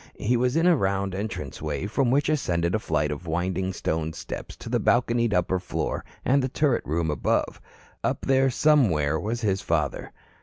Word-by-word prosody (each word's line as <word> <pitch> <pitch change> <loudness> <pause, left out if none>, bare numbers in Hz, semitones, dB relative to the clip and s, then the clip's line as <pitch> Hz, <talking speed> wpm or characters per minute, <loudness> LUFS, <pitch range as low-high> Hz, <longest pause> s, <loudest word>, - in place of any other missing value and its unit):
He 120 +4 +1
was 125 +2 +1
in 165 +1 +3
a 180 -1 +6
round 100 -5 0
entranceway 95 -5 -4
from 120 +5 +1
which 140 +3 +2
ascended 85 - 0
a 110 - +2
flight 75 -6 0
of 85 +4 -6
winding 90 +3 -1
stone 80 -3 -2
steps - - -7
to - - -11
the - - +1
balconied 120 -1 +2
upper 95 -1 +1
floor 90 - -3 0.2
and 140 +2 +3
the 130 - -1
turret 140 -2 +1
rooms 80 +1 0
above. 75 - -1 0.4
Up - - -1
there, 135 0 +3
somewhere, 95 - +3
was 115 +3 -3
his 100 -3 0
father. 75 -7 -1
100 Hz, 180 wpm, -25 LUFS, 85-125 Hz, 0.4 s, a